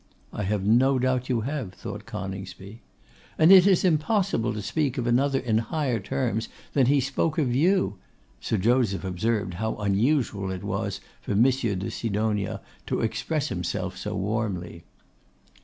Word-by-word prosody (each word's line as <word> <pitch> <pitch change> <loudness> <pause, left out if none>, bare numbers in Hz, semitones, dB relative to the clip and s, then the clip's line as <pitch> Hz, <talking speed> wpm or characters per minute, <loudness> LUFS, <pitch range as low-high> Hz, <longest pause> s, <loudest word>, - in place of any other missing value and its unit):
'I 105 - -3
have 100 0 -1
no 130 +5 +4
doubt 130 0 0
you 120 -3 +1
have,' 130 -5 -4
thought - - -7
Coningsby. 95 +3 -7 0.6
'And 160 +3 +6
it 190 0 +9
is 190 -2 +4
impossible 165 - +1
to 105 - -4
speak 135 +4 -1
of 125 - -1
another 135 +3 +2
in 115 -4 +1
higher 130 -1 -1
terms 115 +1 -2 0.2
than 135 -4 +3
he 140 +1 +4
spoke 140 +4 -1
of 135 -6 +1
you.' 150 - +2 0.4
Sir 110 - -1
Joseph 110 -1 +2
observed 100 +2 -1
how 110 0 -1
unusual 105 0 0
it 95 -1 -5
was - - -3 0.2
for - - -3
Monsieur 120 -1 +3
de 95 +1 -4
Sidonia 105 -2 -1 0.3
to - - -1
express - - -1
himself - - -3
so - - -5
warmly. 95 -5 -3
115 Hz, 155 wpm, -26 LUFS, 100-135 Hz, 0.6 s, it